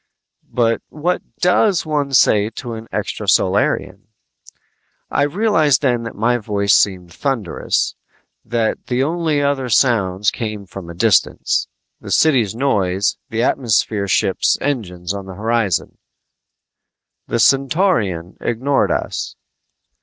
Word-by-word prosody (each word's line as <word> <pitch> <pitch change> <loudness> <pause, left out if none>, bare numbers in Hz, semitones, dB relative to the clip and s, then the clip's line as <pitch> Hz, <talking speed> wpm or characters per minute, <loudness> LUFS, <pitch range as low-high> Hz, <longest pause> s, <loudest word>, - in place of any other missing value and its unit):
but 115 -2 +1
what 170 +4 -1 0.2
does 180 0 +3
one 145 -3 -1
say 105 -4 +4
to 120 +1 -7
an 110 0 -8
extrasolarian? - - 0 1.0
I - - +1
realized 155 - +2
then 120 -3 +2
that 115 - -7
my 120 +3 +1
voice 100 -2 +1
seemed 90 -4 +1
thunderous, 125 - -1 0.5
that 115 -1 -2
the 125 +1 0
only 155 -1 0
other 140 -3 0
sounds 100 -6 +2
came 110 -3 -5
from 95 -2 -9
a 85 - -8
distance: 105 +3 +1 0.3
the - - -10
city's 125 -10 +3
noise, 100 -7 0
the 115 -1 -1
atmosphere 110 -5 +1
ships' - - +1
engines 95 -10 -3
on 100 -1 -7
the 95 - -8
horizon 110 -3 -1 1.3
The - - -1
Centaurian 130 - +1
ignored 130 +4 0
us. - - -3
115 Hz, 115 wpm, -18 LUFS, 100-140 Hz, 1.3 s, say